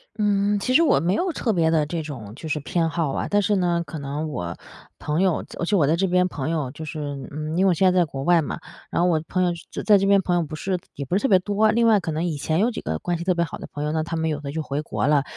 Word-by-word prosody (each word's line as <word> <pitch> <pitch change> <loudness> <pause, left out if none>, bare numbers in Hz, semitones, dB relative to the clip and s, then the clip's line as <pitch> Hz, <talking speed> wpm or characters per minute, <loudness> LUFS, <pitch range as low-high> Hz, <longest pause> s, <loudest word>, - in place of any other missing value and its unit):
嗯， 205 -1 +2
其 255 +6 -1
实 325 - +6
我 330 - +4
没 175 +3 +1
有 360 - 0
特 230 -7 -1
别 165 -2 +2
的 160 -2 +2
这 165 +2 -3
种 120 -9 -8
就 155 +4 -8
是 150 - 0
偏 165 +3 0
好 160 -4 -1
啊， - - -2
但 205 - +3
是 205 +1 +1
呢， 175 -2 +1
可 160 - -7
能 145 +3 -4
我 85 - -4 0.4
朋 150 +4 -1
友 185 -4 +1
仄 - - -12
而 170 - 0
且 205 - +1
我 150 - +4
在 155 +4 +3
这 190 +2 +1
边 180 +1 +3
朋 150 -3 -4
友 150 -6 -1
就 155 +2 -8
是 155 0 -6 0.3
嗯， 155 +2 -4
因 190 +2 +3
为 - - +5
我 180 - +4
现 185 +3 +4
在 185 - +3
在 - - +5
国 135 -3 -5
外 175 0 +4
嘛， 145 - -4 0.3
然 - - -1
后 175 - +3
我 160 -3 +2
朋 185 0 0
友 175 - +2 0.2
就 - - -5
仄 - - -14
在 210 -2 +7
这 195 - +1
边 200 0 +5
朋 175 - +1
友 175 - +2
不 155 -1 -5
是 185 +2 -2 0.2
也 140 - -5
不 175 - -1
是 205 - +2
特 270 - +2
别 190 - +6
多。 205 +3 +2
另 230 +2 +3
外， 220 -3 +5
可 165 - -4
能 160 +2 -2
以 170 -3 -1
前 155 +3 -1
有 235 +4 +2
几 - - -5
个 80 +1 -2
关 175 - -2
系 170 - -4
特 185 0 +1
别 170 0 +1
好 - - -8
的 - - -8
朋 145 - -4
友， 150 - -1
那 160 0 0
他 165 +1 -4
们 160 0 -1
有 150 - -2
的 140 -1 -6
就 160 +1 -3
回 145 +1 -3
国 150 - -2
了， 145 -1 +3
170 Hz, 355 characters per minute, -23 LUFS, 150-190 Hz, 0.4 s, 在